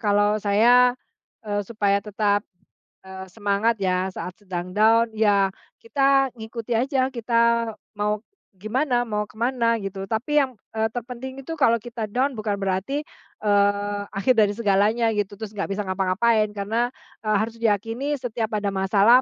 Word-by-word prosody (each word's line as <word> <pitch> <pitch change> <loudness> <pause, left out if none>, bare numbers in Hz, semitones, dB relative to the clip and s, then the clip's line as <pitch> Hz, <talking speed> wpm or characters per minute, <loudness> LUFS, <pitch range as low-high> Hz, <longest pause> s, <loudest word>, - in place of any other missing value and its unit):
kalau 205 0 +2
saya, 245 +5 +5 0.5
eee, 205 -1 -1
supaya 200 -1 0
tetap, 205 0 0 0.6
eee, 190 0 -9
semangat 205 +1 0
ya, 185 0 0
saat 180 - -6
sedang 180 -1 -6
down, 225 +2 +5
ya 200 -3 +3 0.3
kita 270 +2 +3
ngikuti 225 +1 -3
aja, 260 +1 +1
kita 235 -1 +1 0.2
mau 210 0 0 0.4
gimana, 245 +4 0
mau 210 -2 -2
ke 215 - -18
mana, 235 -1 +1
gitu. 195 -2 -6
Tapi 275 +7 +2
yang, 260 -5 -3 0.2
eee, 220 0 0
terpenting 250 +3 -7
itu 325 - -4
kalau 260 -7 +3
kita 225 -2 -6
down, 260 +5 0
bukan 210 -3 -2
berarti, 195 +10 -2 0.3
eee, 205 0 +1
akhir 200 +6 +2
dari 215 -3 +4
segalanya, 220 +2 +2
gitu, 205 -1 -2
terus 215 -1 -7
enggak 200 -1 -3
bisa 210 - -2
ngapa-ngapain. 200 +4 +2
Karena, 225 +5 0 0.3
eee, 215 -2 +1
harus 220 +2 -1
diyakini, 230 +7 0
setiap 230 -3 -3
ada 200 -1 -2
masalah, 200 +6 +5
220 Hz, 150 wpm, -24 LUFS, 205-235 Hz, 0.6 s, saya